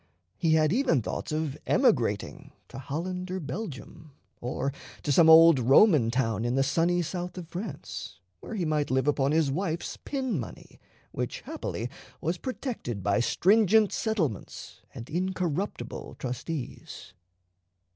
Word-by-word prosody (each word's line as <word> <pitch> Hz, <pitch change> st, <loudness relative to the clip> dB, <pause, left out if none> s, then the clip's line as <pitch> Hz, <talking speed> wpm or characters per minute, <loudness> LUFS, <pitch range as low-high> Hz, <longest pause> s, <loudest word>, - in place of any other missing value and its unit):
He 165 Hz, -2 st, +1 dB
had 155 Hz, +1 st, +3 dB
even 245 Hz, -, +3 dB
thoughts -, -, -4 dB
of 155 Hz, -2 st, -2 dB
emigrating -, -, +1 dB, 0.2 s
to -, -, -8 dB
Holland 180 Hz, +7 st, -4 dB
or 185 Hz, +1 st, -3 dB
Belgium, 155 Hz, -, -7 dB, 0.3 s
or 130 Hz, +3 st, -2 dB, 0.3 s
to 145 Hz, -, 0 dB
some 160 Hz, +3 st, +6 dB
old 165 Hz, -2 st, +8 dB
Roman 135 Hz, -, +5 dB
town 115 Hz, -3 st, 0 dB
in 120 Hz, +1 st, 0 dB
the 135 Hz, -, +3 dB
sunny 170 Hz, +5 st, +1 dB
South 180 Hz, +2 st, -5 dB
of 175 Hz, -3 st, -7 dB
France, 175 Hz, -, -7 dB, 0.2 s
where 225 Hz, -, -7 dB
he 185 Hz, -5 st, -1 dB
might 150 Hz, -2 st, 0 dB
live 130 Hz, +2 st, +1 dB
upon 140 Hz, -1 st, +2 dB
his 155 Hz, -3 st, +2 dB
wife's 170 Hz, +1 st, -3 dB
pin 260 Hz, -, -2 dB
money, 115 Hz, -, -9 dB, 0.3 s
which -, -, -4 dB
happily 115 Hz, -, -4 dB, 0.3 s
was 170 Hz, +3 st, -2 dB
protected 235 Hz, -, -4 dB
by 100 Hz, +3 st, +2 dB
stringent 210 Hz, -, +4 dB
settlements 170 Hz, -, -3 dB
and 115 Hz, -, -8 dB
incorruptible 185 Hz, +1 st, -3 dB
trustees. 130 Hz, +3 st, -6 dB
160 Hz, 135 wpm, -28 LUFS, 135-185 Hz, 0.3 s, old